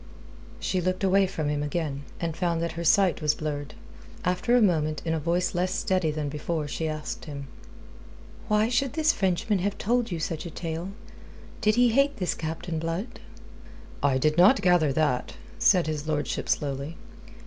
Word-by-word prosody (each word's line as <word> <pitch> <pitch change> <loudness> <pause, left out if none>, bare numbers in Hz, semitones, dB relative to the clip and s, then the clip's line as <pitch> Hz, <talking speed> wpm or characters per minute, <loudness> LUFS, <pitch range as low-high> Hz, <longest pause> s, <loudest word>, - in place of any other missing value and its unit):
She 185 - -1
looked 185 +2 -1
away 195 0 +4
from 160 -5 -3
him 145 0 -1
again, 145 -2 -3
and 165 -2 -2
found 170 -2 0
that 170 0 -1
her 170 +1 -5
sight 185 +1 +4
was 150 -1 +2
blurred. 145 -2 -4 0.5
After 180 +7 +2
a - - +5
moment 155 -8 +1
in 160 - 0
a 160 - 0
voice 175 +4 0
less 180 +1 0
steady 185 -5 +1
than 150 -1 -2
before 150 +1 -3
she 160 +2 -3
asked 155 -1 -5
him: 140 -3 -6 1.0
"Why 210 +1 +3
should 250 +3 0
this 315 0 +3
Frenchman 190 +2 0
have 200 +2 -1
told 240 +2 +1
you 170 -3 -3
such 165 +1 -3
a - - -6
tale? 165 +2 -4 0.7
Did 215 0 +3
he 245 0 +5
hate 275 +4 +2
this 180 -3 0
Captain 160 +1 -4
Blood?" 170 +9 -4 0.8
"I 140 -2 +3
did 155 +4 +2
not 200 +4 +6
gather 175 -5 +4
that," 135 -4 0 0.3
said 180 -4 +5
his 155 -1 -3
lordship 150 -2 -2
slowly. 140 +2 -2
170 Hz, 175 wpm, -27 LUFS, 155-190 Hz, 1.0 s, not